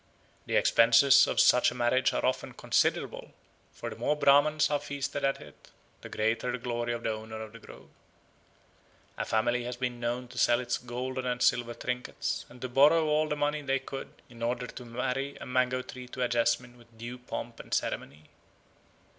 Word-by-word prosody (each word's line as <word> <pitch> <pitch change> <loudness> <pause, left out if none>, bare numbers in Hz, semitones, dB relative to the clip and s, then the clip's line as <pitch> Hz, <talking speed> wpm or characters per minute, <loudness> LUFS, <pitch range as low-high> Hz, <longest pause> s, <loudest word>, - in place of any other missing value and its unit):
The - - -1
expenses 125 +4 +6
of - - -1
such 125 - +6
a - - -9
marriage 125 +2 +2
are - - -1
often 130 - -1
considerable, - - 0 0.4
for - - -7
the - - -7
more 150 - 0
Brahmans 150 +2 +4
are 145 - +2
feasted 140 0 -4
at 135 0 +1
it, 75 -1 -15 0.3
the - - -9
greater 110 +3 0
the - - -2
glory 120 -1 -3
of 120 -1 -4
the 115 - 0
owner 110 0 -6
of 110 -1 -7
the 115 - -12
grove. - - -14 1.2
A - - -3
family 120 +2 +1
has 125 0 -5
been 125 -1 -3
known 120 +1 -2
to - - -7
sell 120 0 +4
its 120 -1 -2
golden 125 +1 -4
and 125 0 -1
silver 120 -1 +2
trinkets, 125 0 -3
and 125 - -14
to 130 - -2
borrow 150 +6 +5
all 155 0 +1
the 150 - 0
money 150 +1 -1
they 135 -1 0
could 135 0 -9
in 115 -1 -15
order 120 +1 -1
to 125 0 -9
marry 125 +4 -3
a - - -9
mango 130 0 0
tree 125 0 -9
to 125 0 -4
a - - +2
jasmine 120 +1 0
with 115 -1 -21
due 120 +2 -7
pomp 125 - -7
and - - -11
ceremony. 75 +3 -2
125 Hz, 195 wpm, -29 LUFS, 120-135 Hz, 1.2 s, expenses